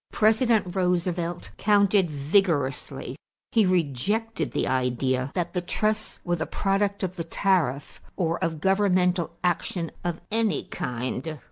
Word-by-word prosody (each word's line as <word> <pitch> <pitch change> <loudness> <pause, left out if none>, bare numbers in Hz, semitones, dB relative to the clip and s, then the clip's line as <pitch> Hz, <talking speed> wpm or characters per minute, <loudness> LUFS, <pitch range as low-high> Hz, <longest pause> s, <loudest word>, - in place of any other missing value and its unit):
President 220 -3 +3
Roosevelt 175 -1 -1
countered 200 -3 +3
vigorously. 145 -1 0 0.4
He 220 -5 +4
rejected 180 - 0
the - - 0
idea 130 0 0
that 175 -1 -1
the 180 - 0
trusts 215 +4 -1
were 175 -1 0
the 160 - -3
product 200 0 0
of 185 0 -3
the 165 - -2
tariff 165 -6 0
or 170 -1 -1
of 165 -2 -1
governmental 185 -2 +2
action 175 -1 -1
of 175 -2 -2
any 225 -1 +1
kind. 125 +5 -4
180 Hz, 125 wpm, -26 LUFS, 160-200 Hz, 0.4 s, He